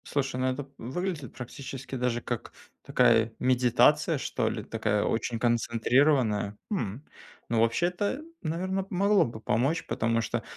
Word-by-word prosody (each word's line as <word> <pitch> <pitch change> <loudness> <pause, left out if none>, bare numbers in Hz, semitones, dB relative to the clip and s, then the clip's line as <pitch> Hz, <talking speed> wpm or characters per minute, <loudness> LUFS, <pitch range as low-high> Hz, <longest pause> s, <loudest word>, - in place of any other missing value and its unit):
Слушай, 135 -3 0
ну 130 - +2
это 130 +2 -2
выглядит 145 - -4
практически 135 +2 -7
даже 125 -2 0
как - - -5 0.3
такая 115 0 +3
медитация 125 -1 +3
что - - -1
ли, - - -4
такая 110 -2 -1
очень 115 0 -1
концентрированная. 120 -2 +2
М! 135 - -3 0.4
Ну, 115 -1 +1
вообще-то, 180 - 0 0.2
наверно, 185 +3 -2
могло 200 +2 +3
бы 115 -2 -7
помочь, 135 +11 0
потому 115 +1 0
что 115 - -2
125 Hz, 130 wpm, -28 LUFS, 115-155 Hz, 0.4 s, такая